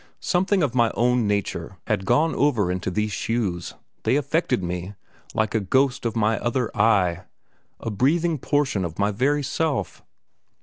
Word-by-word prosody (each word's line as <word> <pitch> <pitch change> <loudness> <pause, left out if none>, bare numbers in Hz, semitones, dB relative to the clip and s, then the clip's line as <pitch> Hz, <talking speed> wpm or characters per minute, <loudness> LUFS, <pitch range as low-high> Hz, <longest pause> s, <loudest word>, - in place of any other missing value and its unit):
Something 190 0 +1
of 135 -4 0
my 120 -2 +3
own 120 -1 +2
nature 100 -3 -2
had 100 -3 -1
gone 160 +2 +3
over 115 -11 +2
into 90 0 -2
these 105 +3 -1
shoes; 100 -7 -2 0.3
they 115 +4 +1
affected 145 - 0
me, 90 +3 -4 0.4
like 110 -1 0
a 110 - +2
ghost 125 +5 +1
of 115 - -4
my 110 0 +1
other 120 0 -1
I 100 -6 +2 0.5
a 115 - -4
breathing 155 - +1
portion 135 -9 0
of 85 -2 -5
my 100 +1 +1
very 140 +7 +1
self. 145 +2 -2
115 Hz, 160 wpm, -24 LUFS, 100-140 Hz, 0.5 s, my